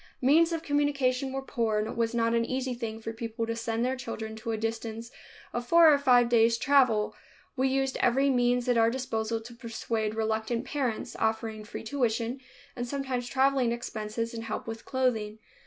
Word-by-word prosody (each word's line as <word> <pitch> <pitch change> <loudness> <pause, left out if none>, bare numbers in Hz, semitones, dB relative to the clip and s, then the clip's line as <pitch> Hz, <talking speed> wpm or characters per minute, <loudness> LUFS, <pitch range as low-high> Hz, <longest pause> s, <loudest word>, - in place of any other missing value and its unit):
Means 325 +6 +5
of 330 -1 -2
communication 280 -3 +1
were 270 0 -3
poor 230 -5 -1
and 210 +1 0
it - - -6
was 230 0 0
not 230 0 +2
an 230 0 +2
easy 255 +1 -2
thing 225 -2 -5
for 225 0 -5
people 225 0 -4
to 230 0 -3
send 230 +1 -1
their 260 +1 0
children 230 -3 -6
to 225 +1 -4
a 220 - -1
distance 225 +1 -4 0.4
of 240 0 -3
four 335 0 +7
or 285 - +3
five 245 -3 +5
days' 230 -1 +4
travel. 250 -5 +3 0.4
We 265 0 +2
used 270 0 0
every 270 +3 +3
means 245 0 +2
at 245 -2 +3
our 225 0 +5
disposal 230 -3 -2
to 240 +2 -11
persuade 225 -2 -3
reluctant 220 +2 -1
parents, 260 -5 -2
offering 220 -1 -1
free - - -7
tuition 235 0 -1 0.4
and 245 -1 -4
sometimes 260 -2 -3
traveling 265 -2 +2
expenses 230 -1 -4
and 225 0 -5
help 215 - -4
with 225 0 -7
clothing. 230 -5 0
235 Hz, 190 wpm, -28 LUFS, 225-260 Hz, 0.4 s, four